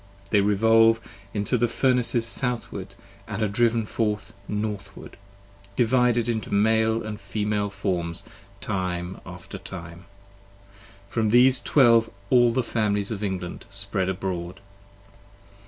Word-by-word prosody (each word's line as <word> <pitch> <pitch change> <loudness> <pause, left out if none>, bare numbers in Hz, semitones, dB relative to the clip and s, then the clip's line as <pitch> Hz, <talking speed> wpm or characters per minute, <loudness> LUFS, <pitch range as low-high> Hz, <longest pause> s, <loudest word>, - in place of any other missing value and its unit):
They 105 - +5
revolve 115 +3 +4 0.3
into 105 +4 0
the 120 - +3
Furnaces 120 -1 +2
Southward 115 -6 -3 0.2
& 100 0 -25
are 110 0 -1
driven 115 +1 +1
forth 105 -1 -2
Northward, 105 -2 -5 0.6
Divided 120 0 +2
into 110 -3 -2
Male 110 +2 +2
and 110 -1 -6
Female 105 -1 -1
forms 90 -4 -2 0.4
time 90 -1 -3
after 90 -1 -9
time. 85 0 -9 1.0
From 110 0 0
these 125 +3 +5
Twelve 115 -5 +4 0.2
all 120 -2 +5
the 125 +2 0
Families 105 -3 -1
of 105 -1 -4
England 95 -3 -4
spread 100 -1 -1
abroad. 90 -2 -4
105 Hz, 115 wpm, -25 LUFS, 100-115 Hz, 1.0 s, They